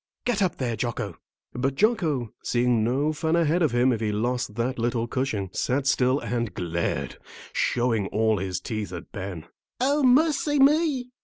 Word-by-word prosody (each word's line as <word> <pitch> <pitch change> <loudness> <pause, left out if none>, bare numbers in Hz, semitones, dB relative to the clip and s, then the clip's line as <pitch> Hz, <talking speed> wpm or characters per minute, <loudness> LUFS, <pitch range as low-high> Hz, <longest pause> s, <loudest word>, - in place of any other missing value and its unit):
Get 240 -4 0
up 185 -2 +1
there, 120 -3 -1
Jocko!" 110 -6 -4 0.3
But 135 +2 -1
Jocko, 155 - +1
seeing 120 -2 +1
no 140 +7 +1
fun 160 +2 0
ahead 170 +1 +2
of 160 - +4
him 125 +2 +3
if 115 - -3
he 110 -1 0
lost 120 +1 -1
that 120 +2 -2
little 115 0 0
cushion, 110 -7 -2
sat 135 +2 0
still 130 0 +2
and 120 -5 -2
glared, 85 -1 -2 0.3
showing 115 -5 +1
all 110 0 +1
his 95 -1 -3
teeth 110 -5 -4
at 90 -1 -8
Ben. 95 -5 -6 0.3
"O 280 +4 +2
mercy 290 +2 +3
me!" 275 -3 +3
125 Hz, 165 wpm, -25 LUFS, 110-165 Hz, 0.3 s, of